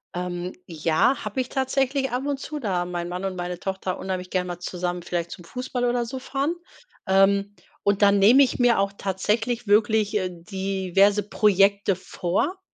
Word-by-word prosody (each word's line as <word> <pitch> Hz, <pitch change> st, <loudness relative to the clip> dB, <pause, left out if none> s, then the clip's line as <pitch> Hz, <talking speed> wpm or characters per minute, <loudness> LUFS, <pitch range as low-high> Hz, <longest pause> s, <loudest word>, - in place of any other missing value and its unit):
Ähm. 180 Hz, 0 st, -4 dB
Ja, 165 Hz, -, +1 dB
habe 215 Hz, +4 st, -4 dB
ich 255 Hz, -, -6 dB
tatsächlich 265 Hz, 0 st, 0 dB
ab 250 Hz, +3 st, -2 dB
und 285 Hz, -1 st, -2 dB
zu, 305 Hz, +2 st, -6 dB
da 185 Hz, -8 st, -1 dB
mein 175 Hz, -1 st, -4 dB
Mann 180 Hz, +2 st, -4 dB
und 190 Hz, -1 st, -3 dB
meine 180 Hz, 0 st, -4 dB
Tochter 190 Hz, -1 st, -3 dB
unheimlich 185 Hz, -1 st, -4 dB
gern 180 Hz, -1 st, 0 dB
mal 175 Hz, -1 st, -5 dB
zusammen 180 Hz, 0 st, -3 dB
vielleicht 170 Hz, -1 st, -3 dB
zum 175 Hz, -, -9 dB
Fußball 250 Hz, +5 st, -3 dB
oder 240 Hz, 0 st, +1 dB
so 260 Hz, +3 st, -6 dB
fahren. 275 Hz, +5 st, -2 dB, 0.5 s
Ähm. 200 Hz, +1 st, +3 dB, 0.3 s
Und 200 Hz, 0 st, +1 dB
dann 200 Hz, 0 st, +5 dB
nehme 240 Hz, +8 st, +7 dB
ich 260 Hz, -, -1 dB
mir 245 Hz, -1 st, +4 dB
auch 195 Hz, 0 st, +1 dB
tatsächlich 225 Hz, +5 st, -1 dB
wirklich, 210 Hz, 0 st, +3 dB
äh, 185 Hz, -2 st, -1 dB
diverse 195 Hz, +2 st, +1 dB
Projekte 200 Hz, -1 st, +3 dB
vor. 185 Hz, -, -2 dB
200 Hz, 175 wpm, -24 LUFS, 180-240 Hz, 0.5 s, nehme